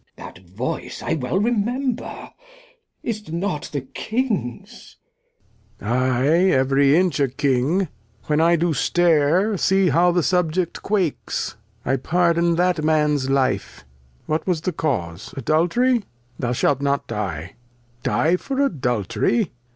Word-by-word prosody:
Glost. - - -10
That 90 - -16
Voice 125 - -5
I - - -1
well 155 +5 -1
remember, 240 +4 -2 0.7
is't 210 -6 -4
not 170 -2 -3
the 145 - -2
King's? 215 - -4 0.8
Lear. 105 - -6
I, 130 +1 +1 0.2
every 135 -1 +3
Inch 180 -3 +1
a 140 - +3
King, 140 +7 +1 0.4
when 150 +1 +1
I 170 +1 +5
do 170 0 +1
Stare 175 +6 +2
See 190 0 +3
how 170 +5 +4
the 175 -1 +1
Subject 180 -1 0
quakes. 190 -7 -1 0.3
I 135 +2 +1
pardon 170 +3 +2
that 175 -2 +1
Man's 150 -3 +2
Life, 135 - 0 0.4
what 155 +3 -2
was 175 -4 0
the 180 +1 -2
Cause? 105 - -3
Adultery? 175 - +2 0.4
Thou 120 -2 -1
shalt 135 +2 +1
not 140 0 0
Die. 90 -7 -4 0.5
Die 165 +8 +2
for 270 +7 -4
Adultery 145 - 0
160 Hz, 130 wpm, -22 LUFS, 135-185 Hz, 0.8 s, I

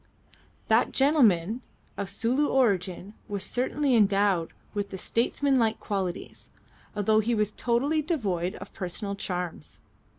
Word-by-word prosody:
That - - +3
gentleman 235 - +3 0.3
of 200 -1 -4
Sulu 245 +8 +1
origin 195 -6 0
was 200 -3 -3
certainly 265 +2 0
endowed 200 -5 +3 0.2
with 200 -2 -4
statesmanlike 235 0 +1
qualities, 190 -4 -4 0.5
although 215 +1 +3
he 230 +2 +1
was 210 -1 +1
totally 270 +9 +1
devoid 195 - -1
of - - -10
personal 200 +3 -4
charms. 180 -5 -5
210 Hz, 110 wpm, -27 LUFS, 190-250 Hz, 0.5 s, That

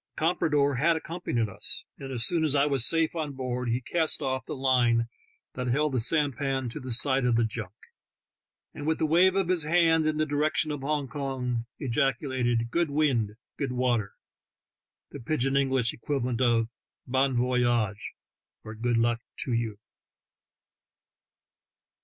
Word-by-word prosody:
The - - -8
comprador 150 -4 +2
had 165 +5 +3
accompanied 160 -8 -2
us, 100 - -3
and 135 -1 -7
as 120 -3 +2
soon 170 -2 +2
as 150 -2 +2
I 140 0 +4
was 135 -5 +4
safe 165 0 +1
on 155 -3 -3
board 125 -2 -3
he 120 +2 0
cast 160 +5 +2
off 130 -1 -2
the - - -4
line 125 -3 +2 0.5
that 125 0 -4
held 150 +4 +1
the 130 - 0
sampan 135 -1 +1
to - - -7
the 130 - -8
side 130 +3 +3
of 125 -1 +2
the 115 - +3
junk, 110 -3 -5 1.0
and 145 - -7
with 160 - +1
the - - 0
wave 180 +4 +4
of 195 -3 +1
his 180 -2 +1
hand 160 0 +3
in 155 -1 0
the 155 - +1
direction 150 +1 0
of 145 -2 -4
Hong 145 0 -1
Kong, 125 -3 -3
ejaculated, 125 -2 -1
"Good 170 +1 +1
wind! 135 -8 +1 0.2
good 135 -3 -2
water!" 120 -5 0 0.5
— - - -65
the 145 - -8
pidj 135 +2 -1
in 135 0 0
English 130 -4 +1
equivalent 125 -1 -2
of 115 -2 +2 0.4
"Bon 130 +1 +1
voyage 125 0 +1
I'' 115 -4 +1 0.8
or - - -6
"Good 120 +2 -1
luck 115 0 +1 0.2
to 125 - -2
you! 115 -3 -2
130 Hz, 170 wpm, -27 LUFS, 120-150 Hz, 1.0 s, I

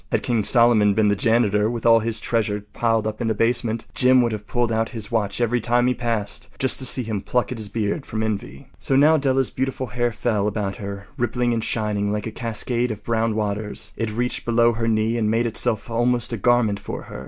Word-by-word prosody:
Had - - 0
King 115 -3 0
Solomon 115 -3 +4
been 110 -1 +3
the 105 - +2
janitor, 105 -1 +2
with 120 -1 -5
all 115 -1 +6
his 115 0 -1
treasures 105 -3 -1
piled 115 -2 +1
up 110 +2 -4
in 115 - -1
the 110 - 0
basement, 115 -1 0
Jim 130 -1 +4
would 120 - 0
have 105 -1 -6
pulled 120 -1 0
out 110 0 0
his 110 +2 -6
watch 110 -2 -1
every 120 0 +1
time 120 +2 +2
he 125 - +2
passed, 115 0 -3
just 130 - +4
to 130 - 0
see 125 - +1
him 110 -3 -3
pluck 125 +4 -1
at 125 - -5
his 105 -2 -4
beard 110 +7 -2
from 110 0 -3
envy. 110 +5 -4
So 135 - 0
now 150 +4 +5
Della’s 135 -3 +1
beautiful 130 0 -2
hair 120 0 0
fell 105 -2 -1
about 105 -1 -3
her 100 -2 -7
rippling 120 0 0
and 115 -1 -1
shining 105 -3 -1
like 105 0 -2
a 110 - -4
cascade 120 +2 -2
of 105 -2 -6
brown 115 -1 0
waters. 105 0 -3
It 115 - -2
reached 120 +3 -2
below 120 0 +3
her 115 0 -2
knee 110 +1 +1
and 110 -2 +1
made 115 +2 +1
itself 115 -1 0
almost 120 +1 0
a - - -2
garment 110 -2 +2
for - - -6
her. - - -9
115 Hz, 230 wpm, -22 LUFS, 105-120 Hz, -, all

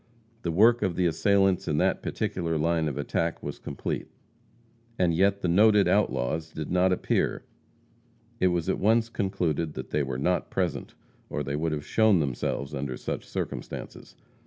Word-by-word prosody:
The 85 - -2
work 115 +7 +5
of 95 -4 0
the 90 - +1
assailants 95 +2 +2
in 75 - 0
that - - +1
particular 85 -3 -2
line 80 0 +1
of 70 - -3
attack 85 0 -2
was - - -5
complete. - - -4 0.9
And 90 -2 +2
yet 100 +4 +2
the - - 0
noted 105 +2 +5
outlaws 80 -5 0
did 75 -2 -6
not 90 +1 +3
appear. 90 - 0 1.0
It 95 - +4
was 85 -2 0
at 95 - 0
once 115 +3 +3
concluded 85 -7 -1
that - - -7
they 75 - +1
were 65 -2 -3
not 90 +5 0
present - - -2 0.3
or 75 - -2
they 70 +1 -3
would 80 +2 -1
have 75 -1 -3
shown 110 -3 +4
themselves 70 0 -2
under 70 -2 -3
such - - -5
circumstances. - - -6
85 Hz, 165 wpm, -27 LUFS, 75-95 Hz, 1.0 s, work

